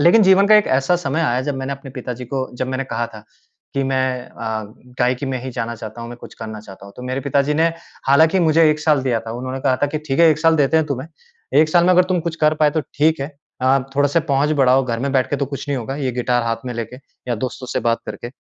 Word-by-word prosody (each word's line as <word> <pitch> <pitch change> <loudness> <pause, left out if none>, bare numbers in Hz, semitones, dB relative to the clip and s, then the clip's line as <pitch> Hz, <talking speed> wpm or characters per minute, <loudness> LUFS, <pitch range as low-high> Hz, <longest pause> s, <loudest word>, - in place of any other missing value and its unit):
लेकिन 175 +9 +6
जीवन 190 0 +5
का 215 - +7
एक 210 - +3
ऐसा 135 +6 +2
समय 160 -2 -2
आया 130 -6 +1
जब 145 +1 -2
मैंने 135 +1 -3
अपने 140 0 -9
पिताजी 125 -1 -6
को, 130 +1 -3
जब 130 - -2
मैंने 130 +1 -2
कहा 120 -2 -2
था 110 - -12 0.5
कि 140 - +1
मैं 130 -1 -1
अ, 110 -1 -4 0.4
गायकी 125 +2 +1
में 130 -1 -2
ही 130 - -5
जाना 115 0 -3
चाहता 110 +1 -8
हूँ, 115 - -6
मैं 120 - -8
कुछ - - -12
करना 110 -1 -7
चाहता 100 -2 -13
हूँ। 100 - -13
तो 125 - -9
मेरे 130 +1 -2
पिताजी 140 +2 +1
ने 160 +2 +3 0.4
हालाँकि 160 +6 +5
मुझे 160 -1 +4
1 155 - -1
साल 150 -3 +2
दिया 125 -3 +1
था, 115 0 -8
उन्होंने 130 +2 -5
कहा 130 -1 +2
था - - +5
कि 155 +2 -3
ठीक 135 - 0
है 165 - +7
1 155 - +1
साल 165 0 +4
देते 145 +2 +3
हैं 160 - 0
तुम्हें, 140 0 -4 0.5
1 155 - +5
साल 175 +1 +4
में 180 - +4
अगर 180 0 +5
तुम 180 -1 0
कुछ 165 0 -4
कर 155 0 +4
पाए 150 -1 +5
तो 155 - 0 0.2
ठीक 155 0 +3
है। 135 - -2 0.4
अ, 130 +1 +4 0.2
थोड़े-से 145 +3 +3
पहुँच 140 +2 +2
बढ़ाओ, 130 +1 +4
घर 115 -2 -2
में 140 +2 -1
बैठ 130 -2 +1
के 145 - +1
तो 140 0 -1
कुछ 140 +1 -7
नहीं 140 -2 0
होगा 135 +3 -5
ये 135 -4 -2
गिटार 125 0 0
हाथ 115 0 0
में 125 - -3
लेके 115 +1 -5 0.3
या 120 - +1
दोस्तों 125 0 -8
से - - 0
बात 115 - +2
करके। 120 - -6
135 Hz, 275 wpm, -20 LUFS, 125-155 Hz, 0.5 s, का